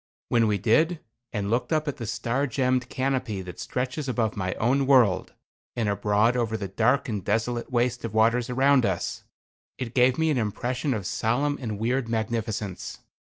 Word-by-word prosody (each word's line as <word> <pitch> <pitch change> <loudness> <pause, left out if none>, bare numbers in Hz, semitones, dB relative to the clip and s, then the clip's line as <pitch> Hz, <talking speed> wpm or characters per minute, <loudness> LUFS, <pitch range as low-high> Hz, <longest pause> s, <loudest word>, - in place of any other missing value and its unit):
When 115 -2 +3
we 105 -1 +1
did, 155 - +2 0.3
and 105 -2 -2
looked 120 +1 0
up 155 -1 +1
at 145 - -2
the 115 - -5
star 115 +6 -1
gemmed 125 -1 0
canopy 130 -7 -1
that 90 -1 -9
stretches 130 +3 -3
above 115 -4 0
my 95 -2 -2
own 130 +4 +1
world, 120 -9 +4 0.4
and 115 -3 0
abroad 105 +3 +2
over 115 -3 0
the 100 -2 -4
dark 130 +8 +2
and 105 -5 -3
desolate 115 +5 -1
waste 120 0 0
of 110 -2 -5
waters 115 +3 +3
around 135 +1 +4
us, - - -2 0.5
it 125 -2 -5
gave 125 0 +4
me 160 -1 +2
an 135 - +1
impression 125 +5 -1
of 100 -4 -4
solemn 140 +9 0
and 110 -4 -3
weird 120 +3 -1
magnificence. 110 -3 -3
120 Hz, 175 wpm, -26 LUFS, 110-130 Hz, 0.5 s, world